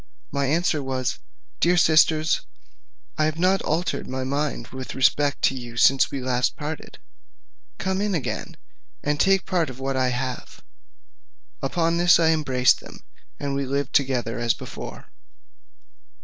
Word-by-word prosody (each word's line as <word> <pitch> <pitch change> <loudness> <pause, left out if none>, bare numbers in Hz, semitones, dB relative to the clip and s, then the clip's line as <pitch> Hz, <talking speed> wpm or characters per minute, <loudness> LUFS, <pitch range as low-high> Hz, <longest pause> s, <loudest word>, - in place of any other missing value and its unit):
My 140 -1 0
answer 155 +1 +1
was, 130 -2 -2 0.4
"Dear 175 +1 +3
sisters, 155 -1 +4 0.8
I 155 - +4
have 155 0 -1
not 185 +3 +2
altered 165 +4 -1
my 130 0 -3
mind 140 +3 -2
with 130 -1 -7
respect 140 +2 +2
to 135 - +3
you 120 -2 -8
since 135 +2 +5
we 135 - -4
last 125 -1 0
parted: 150 0 -6 0.8
come 190 +1 -1
again, 195 -9 -3 0.5
and 145 0 0
take 195 -1 +3
part 175 -6 0
of 130 0 -10
what 135 0 -2
I 130 -1 +2
have." 125 0 -5 1.0
Upon 165 +5 0
this 175 0 +5
I 160 -1 +4
embraced 130 -5 +3
them, - - -13 0.4
and 140 -1 -3
we 140 0 -1
lived 140 0 -2
together 125 -4 +1
as 120 -1 +1
before. - - -9
140 Hz, 145 wpm, -24 LUFS, 130-165 Hz, 1.0 s, since